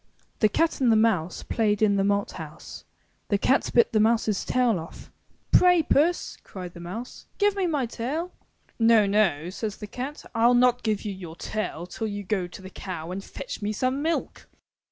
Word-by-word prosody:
The 215 Hz, -, +4 dB
cat 325 Hz, +6 st, +1 dB
and 245 Hz, -3 st, +4 dB
the -, -, +5 dB
mouse 195 Hz, -7 st, +1 dB
Played 215 Hz, -2 st, +1 dB
in 205 Hz, -2 st, +4 dB
the 195 Hz, -, +2 dB
malt 200 Hz, 0 st, +1 dB
house. 160 Hz, -2 st, -9 dB, 0.4 s
The 205 Hz, -, +2 dB
cat 265 Hz, +7 st, +2 dB
bit 235 Hz, -, +4 dB
the 215 Hz, -, +4 dB
mouse^s 220 Hz, -2 st, +2 dB
tail 245 Hz, -6 st, +2 dB
off. 165 Hz, +2 st, -11 dB, 0.4 s
*Tray, 360 Hz, -2 st, +6 dB
Puss/' 325 Hz, +5 st, +1 dB
cried 180 Hz, -2 st, -9 dB
the 170 Hz, -, -11 dB
mouse, 200 Hz, +9 st, -8 dB
*'give 410 Hz, -1 st, +2 dB
me 385 Hz, -2 st, 0 dB
my 295 Hz, -6 st, 0 dB
tail." 280 Hz, +10 st, -3 dB, 0.5 s
''No, 225 Hz, -2 st, +5 dB
no,'* 190 Hz, -6 st, +2 dB
says 210 Hz, +1 st, -4 dB
the 210 Hz, -, -7 dB
cat. 260 Hz, +7 st, -6 dB
'Til 235 Hz, +2 st, +4 dB
not 245 Hz, 0 st, +4 dB
give 215 Hz, -2 st, -1 dB
you 210 Hz, -, -3 dB
your 175 Hz, -4 st, -9 dB
tail 175 Hz, -3 st, -4 dB
till 220 Hz, +4 st, -4 dB
you 205 Hz, -1 st, -4 dB
go 190 Hz, -2 st, -1 dB
to 190 Hz, +2 st, -12 dB
the 190 Hz, -, -9 dB
cow 175 Hz, -4 st, -6 dB
and 195 Hz, +2 st, -5 dB
fetch -, -, -7 dB
me 205 Hz, +1 st, -1 dB
some 255 Hz, +6 st, -1 dB
milk. 325 Hz, +2 st, -2 dB
215 Hz, 195 wpm, -26 LUFS, 190-250 Hz, 0.5 s, Tray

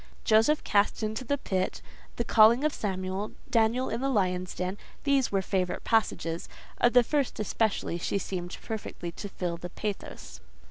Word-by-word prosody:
Joseph 225 Hz, +7 st, +4 dB
cast 205 Hz, +2 st, +2 dB
into 220 Hz, +4 st, -2 dB
the 285 Hz, +3 st, 0 dB
pit; 190 Hz, -7 st, -1 dB, 0.4 s
the 235 Hz, -, -1 dB
calling 230 Hz, +3 st, +6 dB
of 305 Hz, -1 st, +2 dB
Samuel; 190 Hz, 0 st, -3 dB, 0.2 s
Daniel 235 Hz, +2 st, +3 dB
in 230 Hz, -, -2 dB
the 270 Hz, -, +1 dB
lions' 185 Hz, -6 st, 0 dB
den;—these 245 Hz, +8 st, -1 dB
were 195 Hz, -1 st, +1 dB
favourite 185 Hz, -2 st, -1 dB
passages: 170 Hz, -7 st, 0 dB, 0.3 s
of 240 Hz, -, +4 dB
the 245 Hz, -1 st, +7 dB
first 280 Hz, +1 st, -1 dB
especially 215 Hz, -4 st, 0 dB
she 185 Hz, -, -1 dB
seemed 180 Hz, -2 st, -4 dB
perfectly 205 Hz, -5 st, -5 dB
to 205 Hz, +4 st, -7 dB
feel 175 Hz, -3 st, -3 dB
the 175 Hz, +1 st, -7 dB
pathos. 205 Hz, +2 st, -6 dB
210 Hz, 155 wpm, -28 LUFS, 185-235 Hz, 0.4 s, the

